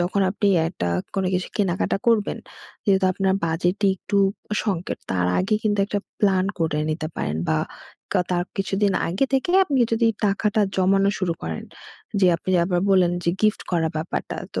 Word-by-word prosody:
যখন 180 +3 0
আপনি 205 +1 0 0.2
একটা 90 - -3 0.3
কোনো 195 -1 0
কিছু 180 0 -1
কেনাকাটা 190 -3 0
করবেন, 225 -3 +2 0.5
যেহেতু 195 -2 +3
আপনার 190 0 +1
বাজেটে 175 +5 0
একটু 200 +2 -1 0.4
সংকট, 185 -5 -2
তার 90 -2 +1
আগে 200 +3 +1
কিন্তু 205 -2 0
একটা 205 - -1 0.2
প্ল্যান 190 -3 +3
করে 160 -3 0
নিতে 155 0 -2
পারেন 75 +1 -2
বা, 80 - +2 0.5
কা - - +3
তার 175 -1 +1
কিছুদিন 195 +1 +1 0.2
আগে 190 +11 +1
থেকে 270 +6 +1
আপনি 285 -7 0
যদি 225 +1 +3 0.2
টাকাটা 205 +2 +1 0.2
জমানো 195 +1 +3
শুরু 185 -3 0
করেন। 80 -1 -4 0.6
যে 190 - +5
আপনি 185 - -5
আবার 175 0 0
বললেন 180 -2 +4
যে, 170 - +3
গিফট 215 -1 +2
করা 165 -3 +1
ব্যাপারটা। 155 +2 -3 0.2
তো - - -1
190 Hz, 170 wpm, -23 LUFS, 175-205 Hz, 0.6 s, যে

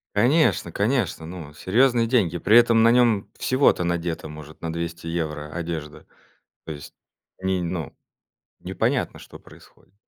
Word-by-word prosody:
Конечно, 120 - +3
конечно, 100 -5 -1
ну, 80 -4 -9
серьезные 115 - +2
деньги. 95 -9 +1
При 110 +6 +5
этом 115 -1 +5
на 115 - +6
нём 115 -5 +3
всего-то 130 -8 +2
надета, 85 -2 -2
может, 75 0 -11
на 80 -1 -4
200 85 0 -5
евро 75 -3 -3
одежда. 80 -3 -6 0.6
То 80 - -6
есть 75 -2 -9 0.5
ни 95 0 0
ну, 85 -4 -4 0.7
непонятно, - - -1
что - - -12
происходит. - - -20
85 Hz, 135 wpm, -24 LUFS, 80-115 Hz, 0.7 s, на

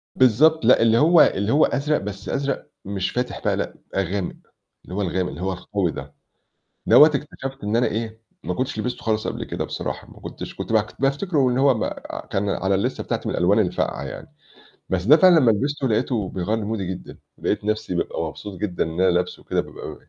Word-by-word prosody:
بالضبط، 130 +4 +4
لأ، 125 - +6
اللي 115 0 +4
هو 165 +5 +6
اللي 100 +3 +2
هو 150 - +5
أزرق 150 +2 0
بس 100 0 -6
أزرق 140 0 -2 0.2
مش 95 -1 -2
فاتح 125 0 -3
بقى، - - +2
لأ - - -3 0.2
غامق، 95 0 -1 0.5
اللي 90 - -8
هو 105 - -1
الغامق 90 -1 -1
اللي 80 - -8
هو 95 0 -1
القوي 90 -1 -2
ده، - - -9 0.7
دوّة 150 - +9
اكتشفت 135 -4 -5
إن 105 +2 0
أنا 125 - +3
إيه 110 +1 -4 0.2
ما 90 +2 -2
كنتش 130 0 -3
لِبستُه 120 +3 -3
خالِص 110 -1 0
قبل - - -3
كده - - -4
بصراحة، - - -5
ما - - -15
كنتش - - -8
كنت - - -5
باك - - 0
بافتِكرُه 140 0 +1
إن 125 - 0
هو 135 -1 +5
ب 110 - -1 0.5
كان 100 +1 -1
على 95 0 0
الليستة 95 - -1
بتاعتي - - -3
من - - -2
الألوان 95 +5 +3
الفاقعة 95 -5 0
يعني، - - -8 0.6
بس 90 -1 -1
ده 150 +8 +8
فعلًا 175 -1 +6
لمّا 120 - +5
لِبستُه 135 +4 0
لقيته 110 -2 0
بيغيّر 100 +5 -2
لي 105 - -4
مودي 105 -3 -3
جدًا، 90 0 -7 0.2
لقيت - - -1
نفسي 110 -4 -1
بابقى 85 - -2
مبسوط 100 -4 -7
جدًا 95 -4 -1
إن 80 +2 -4
أنا 95 -1 +5
لابسُه 90 +1 -1
وكده - - -1
بابقى - - -9
110 Hz, 205 wpm, -23 LUFS, 95-135 Hz, 0.7 s, دوّة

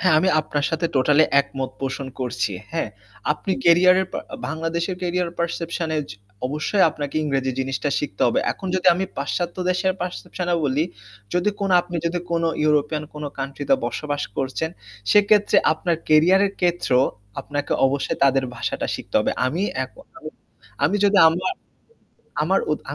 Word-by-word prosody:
হ্যাঁ, 185 -3 +4
আমি 185 - +2
আপনার 145 -1 -2
সাথে 165 +1 0
টোটালি 145 +4 +5 0.2
একমত 135 -2 -5
পোষণ 135 0 -3
করছি। 105 -5 -1 0.2
হ্যাঁ, 165 -9 -1 0.4
আপনি 170 +5 -3
কেরিয়ারের 185 +2 +5
পা - - -2 0.3
বাংলাদেশের 165 +3 -2
কেরিয়ার 180 -1 0
পারসেপশন 170 0 -2
এ - - +1
য - - -10 0.4
অবশ্যই 155 +8 0
আপনাকে 145 -1 -5
ইংরেজি 135 -3 0
জিনিসটা 135 +2 -2
শিখতে 135 -10 -3
হবে। 120 - +2
এখন 190 - -9
যদি 185 0 0
আমি 190 - -1
পাশ্চাত্য 175 -1 -2
দেশের 185 +1 +1
পারসেপশন 180 0 -4
এ - - +4
বলি 145 +3 +1 0.5
যদি 180 +3 +2 0.3
আপনি 175 0 -6
যদি 175 +1 -1
কোনো 165 -1 +1 0.2
ইউরোপিয়ান 150 0 +2
কোন 150 0 -6
কান্ট্রি 140 +1 -4
তে - - +8
বসবাস 145 +4 -3
করছেন 135 +4 -2 0.4
সেক্ষেত্রে 205 0 +4 0.2
আপনার 170 +1 -1
কেরিয়ারের 185 +6 +5
ক্ষেত্রেও 170 -7 +3 0.4
আপনাকে 145 0 -3
অবশ্যই 135 +1 -1
তাদের 135 -1 +3
ভাষাটা - - -2
শিখতে - - -9
হবে। - - +1 0.2
আমি 165 +9 -1 0.2
এখন 130 - -15 0.8
আমি 175 +8 +2
যদি 200 0 +4
আমা 180 +3 -2 1.0
আমি - - +1 0.2
উত - - -2
160 Hz, 150 wpm, -22 LUFS, 140-180 Hz, 1.0 s, তে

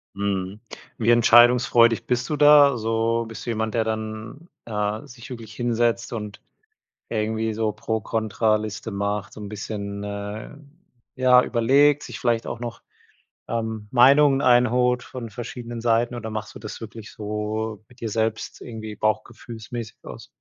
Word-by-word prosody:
Mhm. 100 0 -2 0.4
Wie 115 0 +1
entscheidungsfreudig 120 0 +5
bist 125 0 -1
du 150 - -1
da 145 -2 +7
so? 115 +1 0
Bist 115 - -9
du - - -4
jemand, 110 -1 -1
der 115 - +2
dann, 110 +7 -5 0.2
äh, 105 -1 -2
sich 120 -1 -12
wirklich 115 -3 -9
hinsetzt 120 0 0
und 105 -2 -6 0.7
irgendwie 110 0 -1
so 110 0 -1
Pro-Contra-Liste 110 0 -1
macht, 100 0 -3
so - - -10
'n 105 - -6
bisschen, 100 -1 -5
äh, 105 +2 -6 0.6
ja, 125 -1 +6
überlegt, 140 +5 +3
sich - - -7
vielleicht 120 -2 +1
auch 120 - -4
noch, 120 -1 -6 0.7
ähm, 110 -2 -3
Meinungen 135 +2 +6
einholt 125 0 +3
von 120 -3 -7
verschiedenen 120 +1 -7
Seiten 120 +1 +1
oder 120 -2 -5
machst 110 0 -6
du - - -8
das 110 - -8
wirklich 110 -1 -9
so 105 0 -4
mit 125 - -20
dir 115 - -3
selbst 110 0 -2
irgendwie 110 -2 -7
bauchgefühlsmäßig 110 +1 -4
aus? - - -10
115 Hz, 145 wpm, -24 LUFS, 110-120 Hz, 0.7 s, da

